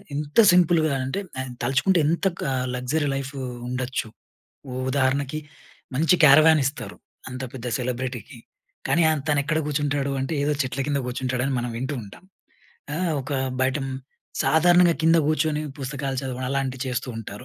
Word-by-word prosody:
ఎంత 150 +6 0
సింపుల్‌గా 165 -4 +4
అంటే, 135 +9 -2 0.2
ఆయన 130 -1 -4
తలచుకుంటే 170 +7 +2
ఎంత 170 +5 0
క - - -3 0.3
లగ్జరీ 140 +5 -1
లైఫ్ 135 0 -4 0.3
ఉండొచ్చు. 125 -1 -3 0.6
ఉ - - -6 0.2
ఉదాహరణకి 140 +2 0 0.6
మంచి 160 +7 +4
కరేవాన్ 155 +2 +7
ఇస్తారు. 125 -7 -4 0.3
అంత 130 0 -6
పెద్ద 125 -2 -6
సెలబ్రిటీకి, 125 -2 -4 0.5
కానీ, 170 - +3
ఆయన 155 -2 +1
తను 145 -1 +3
ఎక్కడ 155 +1 0
కూర్చుంటాడు 145 -2 -1
అంటే 135 +4 -3
ఏదో 150 - +1
చెట్ల 130 +1 -4
కింద 145 -1 0
కూర్చుంటాడు. 125 0 -2
అని 140 - -1
మనం 120 0 -3
వింటూ 130 +5 -3
ఉంటాం. 100 - -14 0.7
ఆహ్, 170 0 0
ఒక 135 - -6 0.3
బయట 130 +1 +2 0.7
సాధారణంగా 175 +2 +5
కింద 165 +1 +5
కూర్చొని 155 0 +1 0.2
పుస్తకాలు 135 0 -3
చదవడం. 130 -1 -4
అలాంటివి 135 -2 -2
చేస్తూ 125 0 -3
ఉంటారు. 105 +1 -8
140 Hz, 150 wpm, -24 LUFS, 130-155 Hz, 0.7 s, కరేవాన్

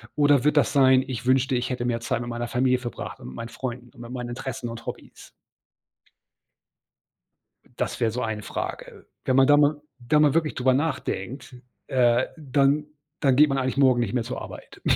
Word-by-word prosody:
Oder 145 -3 +4
wird 150 - +3
das 145 - +3
sein, 130 -2 +5
ich 125 -3 -5
wünschte, 130 +1 +2
ich 120 0 -1
hätte 125 -1 -2
mehr 120 -1 0
Zeit 120 0 -2
mit 120 - -5
meiner 120 0 -3
Familie 125 +1 +2
verbracht 120 -5 -7
und - - -10
mit 65 - -10
meinen 115 - -6
Freunden 125 0 -6
und 125 - -18
mit 120 0 -9
meinen 125 -1 -5
Interessen 125 0 -5
und 115 0 -8
Hobbys?" - - -9 2.5
Das - - -2
wäre 115 - +2
so 120 +3 -4
eine 110 -1 -3
Frage. - - -6 0.2
Wenn 130 - +1
man 135 0 +6
da 145 +1 +6
mal 145 0 +3 0.2
da 125 +5 +2
mal 150 -2 +4
wirklich 160 -2 +1
darüber 130 0 +2
nachdenkt, 130 -4 -3 0.3
äh, 120 -1 +3
dann 145 0 +1 0.3
dann 135 -3 +3
geht 150 +2 +6
man 135 - 0
eigentlich 130 0 -1
morgen 130 -3 +4
nicht 115 -4 -1
mehr 125 - +1
zur - - -5
Arbeit. - - -11
130 Hz, 195 wpm, -25 LUFS, 120-140 Hz, 2.5 s, man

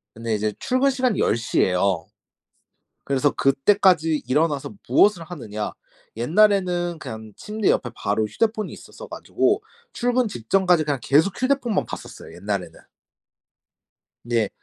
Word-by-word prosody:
근데 115 -1 -2
이제 105 0 -1
출근 255 +2 +2
시간이 255 -6 0
10:00 115 0 +1
예요. 90 -2 +1 1.0
그래서 140 +1 +1
그때까지 160 +2 +3
일어나서 150 +6 0
무엇을 200 -5 +4
하느냐? 110 -11 -6 0.5
옛날에는 175 - +2
그냥 110 -5 -8
침대 210 -1 -1
옆에 120 - 0
바로 105 +2 0
휴대폰이 215 - -1
있었어 - - -11
가지고 - - 0 0.3
출근 245 -1 +1
직전까지 180 - +2
그냥 145 -3 -1
계속 160 +10 +3
휴대폰만 255 -5 +1
봤었어요, - - -9
옛날에는. - - -4 1.5
네. 115 -3 0
160 Hz, 300 characters per minute, -23 LUFS, -, 1.5 s, 무엇을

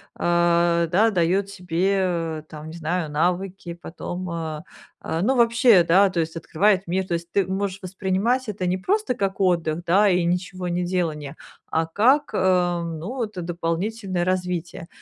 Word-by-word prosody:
а, 170 0 +2
да, 210 +7 +3
даёт 185 +1 +1
тебе, 180 -3 -1
там, 155 0 -9
не 165 - -9
знаю, 165 -1 -2
навыки 180 +2 -1
потом, 180 +1 -6
а, 160 -2 -4 0.4
а, 160 - -2
ну, 255 +8 +2
вообще, 235 -5 +5
да, 190 +4 +5
то 180 -2 -2
есть 160 0 -2
открывает 185 +3 +1
мир. 190 +2 -1
То 175 - -2
есть 170 0 -4
ты 200 -2 +2
можешь 190 +1 -2
воспринимать 195 +7 -1
это 190 -3 -3
не 180 +1 0
просто 410 - 0
как 195 -5 -2
отдых, 170 -3 +1
да, 200 +4 +4
и 180 -2 +2
ничегонеделание, 175 -4 -2 0.3
а 160 0 +1
как, 250 - +2
э, 180 -2 +2
ну, 170 +10 -5
это 210 -5 -5
дополнительное 175 +3 -2
развитие. 180 -1 -2
180 Hz, 150 wpm, -23 LUFS, 170-195 Hz, 0.4 s, вообще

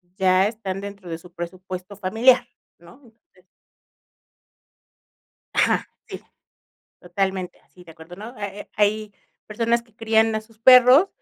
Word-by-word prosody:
ya 185 0 +3
están 200 -3 -5
dentro 200 -3 -9
de 165 - -4
su 175 +1 -17
presupuesto 185 +2 -8
familiar, 225 +6 +3 0.3
¿no? 175 +11 -18
Entonces 225 - -26 2.1
Ajá, - - +2 0.2
sí. - - -8 0.8
Totalmente 185 0 -3
así, 180 - -20
de 165 - -14
acuerdo, 165 +2 -13
¿no? 210 +2 -9
Ha 205 - -6
ha 200 +1 -7
hay 210 0 0 0.3
personas 230 +2 0
que 230 -2 -29
crían 225 0 +2
a 215 - -1
sus 220 0 -22
perros 255 - +7
205 Hz, 135 wpm, -22 LUFS, 185-225 Hz, 2.1 s, perros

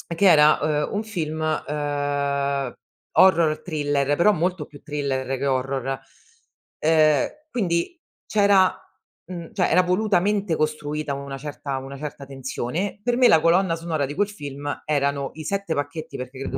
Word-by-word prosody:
che 200 - +2
era, 150 -2 +6 0.3
ehm, - - -8
un 205 +2 -1
film, 160 -8 -4 0.3
ehm, 140 -2 -1 0.4
horror 165 -5 +4
thriller, 145 -4 0
però 190 +7 +4
molto 180 -2 -1
più 145 -2 -15
thriller 140 -3 -2
che 140 - -1
horror. 135 0 -1 0.8
Ehm, 155 -2 +4 0.2
quindi 190 - -1 0.3
c'era 200 -3 +4 0.5
mhmm, 170 -3 -8
cioè, 185 -3 +1
era 185 - +5
volutamente 195 0 +1
costruita 150 -1 -2
una 140 0 -6
certa 140 -1 -5
una 135 +1 -7
certa 145 -1 -7
tensione; 135 +8 -4
per 240 +1 +1
me, 250 -1 +6
la 160 - +6
colonna 170 +1 +3
sonora 165 -3 -2
di 145 - -6
quel 205 - +1
film 145 -7 -6
erano 140 -2 0
i 155 - -8
7 200 +1 -2
pacchetti, 145 +3 -4
perché 130 +1 -8
credo 135 0 -4
150 Hz, 150 wpm, -23 LUFS, 140-180 Hz, 0.8 s, era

